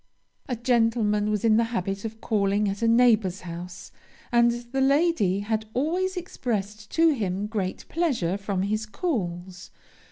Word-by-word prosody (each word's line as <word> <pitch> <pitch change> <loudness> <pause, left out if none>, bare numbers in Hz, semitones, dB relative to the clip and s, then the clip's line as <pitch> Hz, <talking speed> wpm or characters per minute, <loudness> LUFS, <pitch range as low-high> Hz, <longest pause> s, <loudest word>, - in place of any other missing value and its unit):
"A 250 - 0
gentleman 225 -3 +1
was 210 0 0
in 220 -1 +5
the 230 - +3
habit 195 -3 -3
of 220 0 -7
calling 205 -1 +1
at 195 +2 -3
a 230 - +2
neighbor's 225 -5 +3
house, 175 0 -8 0.4
and 235 0 +5 0.2
the 270 0 0
lady 275 - +2
had 220 +1 -2
always 360 +8 0
expressed 215 - -4
to 330 0 +5
him 205 - -1
great 205 -4 -4
pleasure 265 - 0
from 200 -1 -2
his 215 +2 -1
calls. 185 - -4
215 Hz, 150 wpm, -25 LUFS, 195-245 Hz, 0.4 s, in